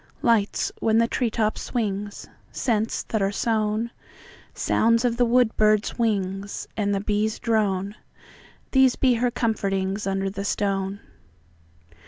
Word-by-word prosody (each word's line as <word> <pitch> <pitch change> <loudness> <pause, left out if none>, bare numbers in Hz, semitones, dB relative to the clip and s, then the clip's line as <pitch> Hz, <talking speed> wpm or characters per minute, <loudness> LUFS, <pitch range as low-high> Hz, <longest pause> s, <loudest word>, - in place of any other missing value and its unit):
Lights, 225 -4 +2
when 220 0 +2
the 230 0 +4
tree 240 0 0
top 215 -1 -1
swings; 205 -3 -3 0.2
Scents 225 -3 -1
that 220 - 0
are 195 0 +1
sown; 220 +1 0 0.6
Sounds 230 +2 +2
of 235 -1 +1
the 245 - +4
wood 240 -1 +3
bird's 215 -1 +2
wings; 200 -3 -1
And 205 -2 0
the 195 - -1
bee's 210 +1 0
drone:These 215 +4 -1
be 255 -2 +3
her 240 +1 +1
comfortingsUnder 195 -3 -1
the 200 0 -4
stone. 195 0 -1
215 Hz, 125 wpm, -24 LUFS, 200-230 Hz, 0.6 s, the